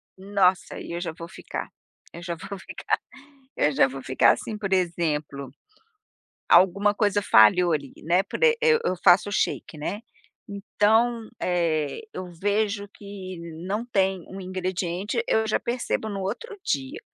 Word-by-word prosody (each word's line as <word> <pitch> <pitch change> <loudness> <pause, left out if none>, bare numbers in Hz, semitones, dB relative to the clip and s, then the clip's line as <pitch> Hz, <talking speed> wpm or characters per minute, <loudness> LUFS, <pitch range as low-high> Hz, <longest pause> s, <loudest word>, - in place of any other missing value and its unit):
Nossa 190 -1 +1
e - - -8
eu 170 - -3
já 170 -2 -3
vou 165 +1 -9
ficar - - -7 0.4
eu 170 - -9
já 170 0 -4
vou 180 +4 -8
ficar - - -2 0.6
eu 150 - +2
já 135 - +4
vou 135 0 -7
ficar 130 - +4
assim 215 - -6
por 200 -2 -4
exemplo, 155 -6 -1 1.0
alguma 200 +3 +5
coisa 205 -1 +1
falhou 165 - +5
ali, 140 -3 -2
né, 175 +4 +3
por - - -6
eu 470 -1 +5 0.3
eu 185 - 0
faço 180 +2 +6
o - - -5
shake, 175 - -1
né, 200 +8 -4 0.5
então, 220 +3 +1
eh, 165 - 0
eu 185 - -5
vejo 205 0 0
que 195 -3 -9 0.3
não 210 +4 -2
tem 190 -6 0
um 195 - -8
ingrediente 185 +3 -2
eu 220 0 +2
já 215 - +1
percebo 235 -2 -2
no 200 -2 -4
outro 325 - -5
dia, 135 -2 -2
190 Hz, 155 wpm, -25 LUFS, 170-205 Hz, 1.0 s, faço